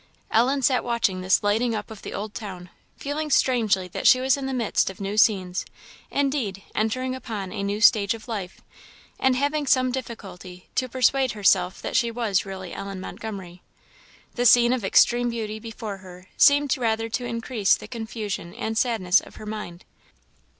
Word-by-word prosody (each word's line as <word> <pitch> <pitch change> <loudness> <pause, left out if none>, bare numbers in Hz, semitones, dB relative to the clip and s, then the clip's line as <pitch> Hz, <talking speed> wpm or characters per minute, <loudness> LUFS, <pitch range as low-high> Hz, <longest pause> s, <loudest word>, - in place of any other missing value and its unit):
Ellen 260 +4 +2
sat 255 0 +3
watching 230 -6 0
this 185 +2 +2
lighting 225 +3 +1
up 210 +1 -5
of 215 - -10
the - - -7
Old 210 +1 -5
Town, 185 -4 -8 0.3
feeling 300 +2 -3
strangely 220 -9 +2
that - - -1
she 255 - +7
was 260 0 +3
in 275 -1 -4
the - - -3
midst 235 -6 +1
of 190 - -10
new 200 +1 -3
scenes, 190 -4 +2 0.5
indeed, 265 -9 -1
entering 255 +4 -1
upon 215 -7 -5
a 200 - -4
new 200 +1 -2
stage 210 -1 +5
of 225 +2 -13
life; 200 -6 -5 0.6
and 260 -1 +3
having 285 +2 0
some 255 -1 +3
difficulty 195 -8 -8
to 255 - -1
persuade 260 +1 +2
herself 190 -3 +2
that - - -4
she 235 - +3
was 225 -5 -1
really 190 -2 -7
Ellen 195 -1 -6
Montgomery. 190 -3 -8 0.7
The 245 0 +2
scene 240 +1 +6
of 255 -4 -2
extreme 240 +5 +4
beauty 220 -2 -4
before 220 -2 -7
her 185 -1 -14
seemed 285 -1 +5
rather 225 -1 0
to 245 +2 -3
increase 230 -3 +1
the - - -10
confusion 220 -6 -5
and 220 0 -3
sadness 210 -6 +3
of - - -15
her - - -10
mind. 210 -5 -7
220 Hz, 175 wpm, -24 LUFS, 195-250 Hz, 0.7 s, she